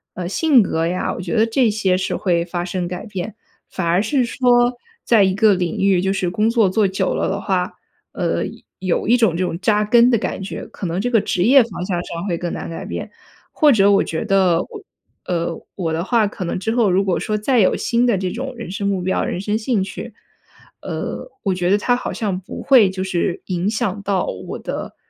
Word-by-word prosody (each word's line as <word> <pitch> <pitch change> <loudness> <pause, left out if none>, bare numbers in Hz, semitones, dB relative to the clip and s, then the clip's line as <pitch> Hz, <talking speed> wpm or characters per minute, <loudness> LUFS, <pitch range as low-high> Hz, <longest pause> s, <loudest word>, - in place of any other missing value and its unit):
呃， 180 -1 -4
性 265 - +4
格 165 -3 -1
呀， 180 +1 -1
我 - - -6
觉 175 +2 -3
得 220 0 +4
这 230 +1 +2
些 205 -3 +1
是 185 - -1
会 170 -3 +1
发 175 0 -4
生 180 -1 -3
改 180 +3 -6
变。 200 -1 -6 0.4
反 190 - -3
而 170 +3 +2
是 250 +4 +1
说， 245 0 +3 0.3
在 230 -3 +4
一 190 -1 +2
个 215 0 +5
领 180 -3 -2
域 195 -2 +3
就 190 +1 0
是 190 -2 -1
工 215 +4 +1
作 230 -3 +3
做 200 +2 +2
久 190 - -1
了 - - -1
的 200 - -2
话， 185 -2 -1 0.4
呃， - - -1
有 - - -8 0.3
有 185 0 -1
一 235 - +5
种 225 -9 +2
这 185 - 0
种 170 -1 -4
扎 210 +1 +2
根 235 +3 +5
的 240 - +3
感 200 - -3
觉， 195 - -6
可 185 - -6
能 170 +2 -2
这 245 +5 -1
个 225 -4 +4
职 180 - 0
业 265 +6 +7
方 200 -6 -4
向 180 -2 -2
上 170 +1 -6
会 175 - 0
更 175 +1 -4
难 - - -5
改 165 - -6
变。 - - -6 0.4
或 300 -2 +4
者 200 -4 +5
我 200 - +4
觉 160 +6 -3
得 190 -5 +3
我 425 -4 -11 0.4
呃， 170 -2 -2
我 165 -4 -2
的 165 +1 -1
话 225 +2 +2
可 200 -1 -5
能 - - -2
之 210 +4 -2
后 230 -5 +3
如 185 +2 +2
果 185 - 0
说 215 0 -1
再 245 +4 +1
有 190 - +4
新 240 +1 +1
的 235 -5 +2
这 185 -1 -2
种 260 +5 -5
人 230 -6 -7
生 200 +1 -2
目 190 -2 -1
标、 190 - 0
人 - - -3
生 205 +2 -1
兴 220 -3 0
趣， 200 +3 -8 0.7
呃， - - -5
我 195 -3 +1
觉 180 -1 -1
得 200 - +4
它 245 +4 +1
好 250 - -4
像 200 -5 -2
不 190 - -9
会 245 -8 +6
就 185 0 -4
是 180 -2 -1
影 185 +1 -1
响 210 -2 -2
到 195 -2 0 0.2
我 - - -5
的， - - -6
195 Hz, 255 characters per minute, -20 LUFS, 180-225 Hz, 0.7 s, 业